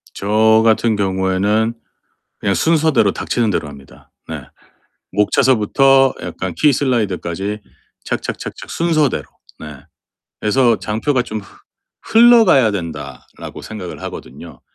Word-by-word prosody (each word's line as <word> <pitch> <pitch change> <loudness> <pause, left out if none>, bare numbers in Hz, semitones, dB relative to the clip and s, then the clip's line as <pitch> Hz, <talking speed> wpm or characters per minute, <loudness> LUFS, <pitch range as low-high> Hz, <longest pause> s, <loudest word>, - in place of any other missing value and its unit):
저 110 +2 +3
같은 115 0 +2
경우에는 100 +3 0 0.7
그냥 100 - 0
순서대로 155 -10 +2
닥치는 115 +2 -1
대로 80 - -2
합니다. 70 -2 -15 0.2
네. - - -6 0.7
목차서부터 130 +5 +3
약간 95 -2 -5
키 150 - +3
슬라이드까지 105 - -2 0.4
착착착착 - - -5
순서대로. 155 -5 0 0.3
네. 75 -3 -10 0.6
그래서 115 +1 +2
'장표가 125 +5 -1
좀 110 -2 -6
흐 - - -16 0.6
흘러가야 225 - +5
된다.'라고 80 -9 -8
생각을 105 -5 -8
하거든요. - - -10
110 Hz, 275 characters per minute, -17 LUFS, 95-135 Hz, 0.7 s, 흘러가야